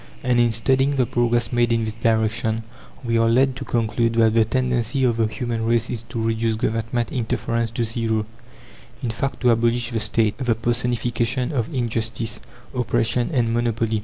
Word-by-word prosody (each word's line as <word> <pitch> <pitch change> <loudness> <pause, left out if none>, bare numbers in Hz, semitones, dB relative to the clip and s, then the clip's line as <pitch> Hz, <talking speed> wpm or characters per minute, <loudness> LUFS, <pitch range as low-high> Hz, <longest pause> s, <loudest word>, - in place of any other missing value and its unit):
And 125 -2 +2
in 120 -1 +4
studying 135 +5 +2
the 130 -2 +2
progress 120 0 0
made 120 -1 +2
in 115 -1 +1
this 110 - -3
direction, 110 0 0 0.4
we 115 -1 +1
are 115 0 +3
led 130 +2 +3
to 135 - -5
conclude 115 -1 0
that 115 -1 +4
the 115 0 +5
tendency 125 +1 0
of 120 -3 +2
the 115 -1 +2
human 115 +1 -3
race 115 0 +1
is 115 - -3
to 115 - -4
reduce 115 0 0
Government 115 +2 -1
interference 115 -2 -1
to 115 +1 -2
zero; 110 -1 -1 0.8
in 120 - -1
fact, 135 +5 -3
to 125 -1 +4
abolish 120 +1 +1
the 115 - -1
State, 110 +1 +1
the 125 -4 +1
personification 120 +1 -1
of 120 -4 -2
injustice, 115 -3 -2 0.3
oppression, 120 -1 0
and 120 -6 +1
monopoly. 115 -2 0
115 Hz, 175 wpm, -22 LUFS, 115-120 Hz, 0.8 s, the